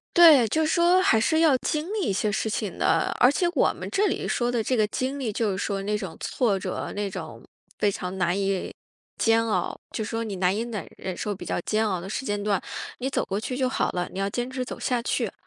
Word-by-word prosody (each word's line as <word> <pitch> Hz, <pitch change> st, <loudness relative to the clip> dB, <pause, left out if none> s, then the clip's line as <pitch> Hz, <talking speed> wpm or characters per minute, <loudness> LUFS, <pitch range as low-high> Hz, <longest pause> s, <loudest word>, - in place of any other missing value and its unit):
对， 310 Hz, -9 st, +8 dB
就 315 Hz, +7 st, +1 dB
说 345 Hz, +3 st, +4 dB
还 225 Hz, -12 st, +4 dB
是 315 Hz, +8 st, +2 dB
要 320 Hz, -4 st, +5 dB
经 310 Hz, +8 st, -2 dB
历 435 Hz, -, -1 dB
一 -, -, +1 dB
些 210 Hz, +2 st, 0 dB
事 220 Hz, +1 st, -1 dB
情 210 Hz, -3 st, -3 dB
的， 165 Hz, -, +2 dB
而 250 Hz, -, +6 dB
且 350 Hz, +5 st, 0 dB
我 -, -, +3 dB
们 -, -, -7 dB
这 405 Hz, +2 st, +2 dB
里 -, -, -2 dB
说 240 Hz, 0 st, 0 dB
的 235 Hz, -2 st, 0 dB
这 255 Hz, -, 0 dB
个 215 Hz, -3 st, +3 dB
经 265 Hz, +5 st, -2 dB
历， 245 Hz, -5 st, -2 dB
就 210 Hz, 0 st, 0 dB
是 190 Hz, -, -3 dB
说 195 Hz, 0 st, -2 dB
那 210 Hz, +1 st, 0 dB
种 190 Hz, -5 st, -6 dB
挫 220 Hz, -6 st, 0 dB
折， -, -, -4 dB
那 205 Hz, 0 st, -1 dB
种， -, -, -8 dB, 0.3 s
非 205 Hz, -, +2 dB
常 185 Hz, -1 st, -5 dB
难 180 Hz, +1 st, +1 dB
以 195 Hz, -1 st, -1 dB, 0.5 s
煎 225 Hz, 0 st, +3 dB
熬， 215 Hz, -, -1 dB
就 220 Hz, -, -3 dB
说 225 Hz, +2 st, -3 dB
你 200 Hz, -4 st, -5 dB
难 180 Hz, +1 st, +2 dB
以 220 Hz, -, -1 dB
奶 225 Hz, -4 st, -5 dB
忍 185 Hz, -1 st, -5 dB
受 205 Hz, +2 st, -3 dB
比 -, -, -9 dB
较 -, -, -1 dB
煎 215 Hz, +3 st, 0 dB
熬 185 Hz, -4 st, -1 dB
的 190 Hz, -, -7 dB
时 265 Hz, -, -3 dB
间 205 Hz, -3 st, -1 dB
段， 200 Hz, -2 st, +1 dB, 0.4 s
你 255 Hz, -, -3 dB
走 -, -, 0 dB
过 195 Hz, -, -2 dB
去 250 Hz, +3 st, -4 dB
就 260 Hz, -1 st, +1 dB
好 -, -, 0 dB
了， 175 Hz, -1 st, -2 dB
你 -, -, -9 dB
要 195 Hz, 0 st, 0 dB
坚 245 Hz, +4 st, -3 dB
持 255 Hz, -1 st, -3 dB
走 -, -, -7 dB
下 245 Hz, -2 st, 0 dB
去。 -, -, -1 dB
220 Hz, 270 characters per minute, -25 LUFS, 195-260 Hz, 0.5 s, 对